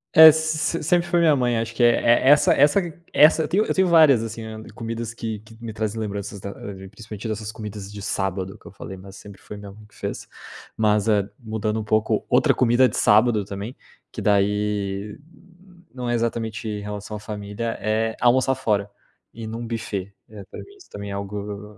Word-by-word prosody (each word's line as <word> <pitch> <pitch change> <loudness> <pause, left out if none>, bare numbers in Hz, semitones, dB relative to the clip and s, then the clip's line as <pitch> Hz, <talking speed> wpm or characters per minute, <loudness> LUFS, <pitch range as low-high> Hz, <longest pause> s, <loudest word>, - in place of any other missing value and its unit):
É, 160 0 +12
s 160 +1 0
sempre 175 +1 +2
foi 175 0 +2
minha 160 -3 +5
mãe. 120 -3 +1
Acho 115 0 -3
que 120 - +1
é 120 - +7
é 120 +3 +4
essa 145 +1 +6
essa 145 +6 +4 0.3
essa 155 +1 +6
eu - - -2
tenho 200 +7 +2
eu - - -1
tenho 190 -1 +3
várias 155 -8 +6
assim, 115 0 -6 0.3
comidas 115 0 -5
que 110 -3 -5
que 110 +1 -17
me 115 -2 -6
trazem 110 +1 -3
lembranças 100 -1 -5
da 100 - -6 0.2
de 95 0 -10
principalmente 105 +2 -9
dessas 110 0 -4
comidas 105 -2 -8
de 105 0 -8
sábado 95 0 -3
que - - -27
eu - - -11
falei. 95 -1 -9
Mas 95 +1 -12
sempre 100 -2 -13
foi 105 - -9
minha 100 -1 -10
mãe 105 +1 -15
que 105 - -23
fez. - - -5 0.5
Mas, 105 0 +2
ah, 100 -1 +2
mudando 110 -1 -2
um 110 - -3
pouco 110 0 0
outra - - +4
comida 125 +1 +4
de - - -5
sábado 110 0 +4
também, 100 +6 -7 0.4
que - - -6
daí 105 0 0 0.7
não 125 -2 -4
é - - +1
exatamente 115 -1 -2
em 105 -1 -4
relação 105 +1 -6
à - - -9
família, 105 +2 -5
é 110 +1 0
almoçar 130 +2 +3
fora. 105 -5 0 0.4
Ir 115 0 -8
num 115 +1 -5
buffet. 100 -4 -4 0.2
Eh, 105 -2 -10
pra - - -9
mim 400 - -12
isso 380 - -18
também 100 0 -7
é - - -4
algo 100 +1 -6
110 Hz, 205 wpm, -23 LUFS, 105-120 Hz, 0.7 s, É